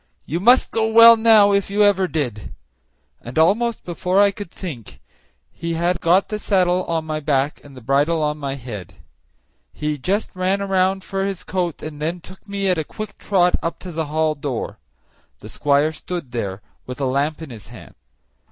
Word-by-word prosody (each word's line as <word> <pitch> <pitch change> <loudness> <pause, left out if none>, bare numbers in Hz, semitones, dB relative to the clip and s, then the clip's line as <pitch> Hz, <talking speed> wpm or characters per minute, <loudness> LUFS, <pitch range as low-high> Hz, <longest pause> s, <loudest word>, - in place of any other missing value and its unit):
You 165 - -2
must 245 +7 +4
go 225 -1 +1
well 230 +1 +9
now, 220 -3 +5
if 200 -1 +1
ever 200 -2 +3
you - - -3
did;" 125 - -4 0.7
and 120 +4 -9
almost 220 +9 +2
before 180 +2 -1
I 200 0 +5
could 200 -2 -8
think 140 - -9 0.5
he 170 0 -4
had 175 +1 0
got 180 +4 +3
the 210 - -3
saddle 185 -3 +1
on 165 -1 -2
my 155 -1 -3
back 145 -1 -1
and 140 -2 -14
the - - -10
bridle 145 +4 +2
on 150 0 -1
my 140 -1 -3
head. 115 -9 -8 0.8
He 150 -1 -3
just 195 +10 -2
ran 190 +2 0
round 190 0 +1
for 195 0 -3
his 195 -2 -3
coat, 180 -4 -3
and 150 -1 -7
then 165 +3 -2
took 190 +4 -14
me 200 -1 -2
at 180 -3 +2
a - - -1
quick 215 +6 -8
trot 180 -3 +2
up 165 - -3
to 185 - -7
the 160 -1 -3
hall 155 +1 +1
door. 140 -4 -5 0.6
The - - -12
squire 145 +2 +1
stood 165 -4 -6
there, 100 -4 -4 0.2
with 125 +1 -7
a 140 - 0
lamp 140 +4 0
in 160 -4 -9
his 110 -4 -10
hand. - - -13
170 Hz, 190 wpm, -21 LUFS, 145-195 Hz, 0.8 s, well